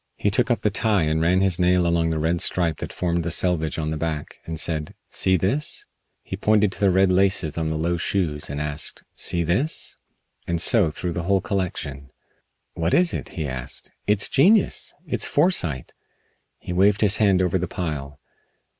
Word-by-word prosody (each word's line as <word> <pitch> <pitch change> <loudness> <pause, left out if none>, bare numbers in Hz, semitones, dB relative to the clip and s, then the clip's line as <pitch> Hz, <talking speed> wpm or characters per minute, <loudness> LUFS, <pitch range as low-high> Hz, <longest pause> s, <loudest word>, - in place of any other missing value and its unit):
He 105 - 0
took 115 +3 +1
up 120 - 0
the 105 - +2
tie 105 -4 +1
and 80 +1 0
ran 90 +3 +3
his 95 -2 +1
nail 90 0 +3
along 85 -1 +1
the 80 - -1
red 80 +2 0
stripe 85 -4 +1
that - - -6
formed 85 -1 -1
the 85 - -2
selvedge 85 -2 0
on 80 -1 -2
the 80 - -2
back, 75 -2 -4
and 80 -1 -4
said: 80 -2 -2 0.2
"See 95 -1 +2
this?" 120 - -2 0.4
He - - -5
pointed 105 0 +2
to - - -6
the 100 - +3
red 95 +1 +3
laces 90 -4 +2
of 80 -1 -1
the 80 - -2
low 85 +2 0
shoes 80 -4 -2
and 70 +1 -4
asked, 75 0 -4
"See 85 -1 0
this?" 100 - -1 0.5
And 85 -1 -1
so 100 -1 +4
through 85 +3 -4
the 85 - -3
whole 100 -1 +4
collection. 75 -9 -4 0.6
"What 85 +1 0
is 180 -1 +3
it?" - - -4
he 80 -3 -2
asked. 65 -2 -5 0.2
"It's 105 -1 +3
genius! 190 +10 +3
It's - - 0
foresight." 90 - 0 0.6
He 90 - -6
waved 100 +3 +3
his 105 -1 +4
hand 100 -4 +3
over 95 0 +1
the 90 - -2
pile. 75 -5 -5
90 Hz, 190 wpm, -23 LUFS, 80-100 Hz, 0.6 s, so